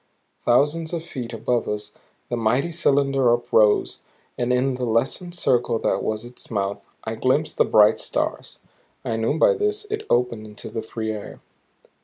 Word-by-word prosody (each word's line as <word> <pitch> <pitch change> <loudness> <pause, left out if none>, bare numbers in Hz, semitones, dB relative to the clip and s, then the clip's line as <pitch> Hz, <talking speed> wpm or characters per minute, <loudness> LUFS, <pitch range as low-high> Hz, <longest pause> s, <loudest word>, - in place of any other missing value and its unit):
Thousands 155 +7 +2
of 165 -1 -2
feet 125 -8 -6
above 120 +1 -1
us 105 0 -3 0.4
the 120 - -1
mighty 125 +8 +1
cylinder 135 -5 +2
uprose, 110 -3 +3 0.4
and 120 0 -1
in 130 +2 +2
the 125 0 -3
lessened 135 +10 0
circle 120 -7 +1
that - - 0
was 110 +1 -2
its 120 +1 -8
mouth 100 -2 -3
I 110 - -3
glimpsed 130 +7 0
the - - +4
bright 105 -1 +5
stars; - - -3 0.5
and 115 0 -2
knew 130 +7 +1
by - - +5
this 420 -1 -1
it 430 0 -3
opened 120 -3 +1
into 105 -1 -9
the 115 - -3
free 110 0 -4
air. 105 -1 -7
120 Hz, 165 wpm, -23 LUFS, 110-145 Hz, 0.5 s, bright